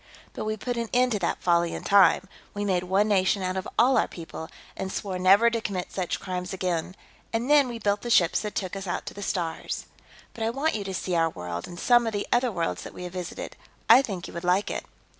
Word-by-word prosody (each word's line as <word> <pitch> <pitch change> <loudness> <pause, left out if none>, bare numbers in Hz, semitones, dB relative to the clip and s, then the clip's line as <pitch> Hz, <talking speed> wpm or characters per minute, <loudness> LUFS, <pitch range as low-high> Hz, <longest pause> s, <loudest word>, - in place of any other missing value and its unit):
But - - -5
we 215 0 -2
put 245 +3 -3
an 230 -1 -2
end 250 0 +3
to 210 - 0
that 175 - -2
folly 170 -1 +2
in - - -6
time; 195 -1 +5 0.3
we 205 0 -2
made 180 -2 0
one 195 +3 +2
nation 195 -1 +2
out 185 0 -1
of 190 - -3
all 255 +1 +5
our - - +1
people, 160 -1 -8 0.3
and 190 - -4
swore 190 -3 -3
never 200 +6 +6
to 230 -1 -1
commit 190 -4 -4
such 185 -3 -2
crimes 180 0 -4
again, 180 -1 -2 0.4
and 235 +5 -1
then 290 -3 +6
we 240 -1 -5
built 205 -2 0
the 240 - -5
ships 175 -7 +4
that 210 -1 -5
took 185 -1 -3
us 195 0 -6
out 175 - -3
to - - -6
the 200 - -9
stars. 170 -5 -3 0.5
But 225 - -5
I 225 - +1
want 275 +7 0
you 210 - -2
to 190 - -4
see 180 - -3
our 165 -1 +3
world, 90 - -6
and 175 0 -9
some 240 -1 +4
of 225 - -2
the 205 - -2
other 245 0 +2
worlds 170 -4 -2
that - - -9
we - - -7
have 180 -1 -7
visited, 180 -2 -6 0.3
I 260 - +9
think 195 -9 -5
you - - -11
would 170 - -6
like 180 +3 +2
it." - - -4
195 Hz, 255 wpm, -26 LUFS, 180-225 Hz, 0.5 s, I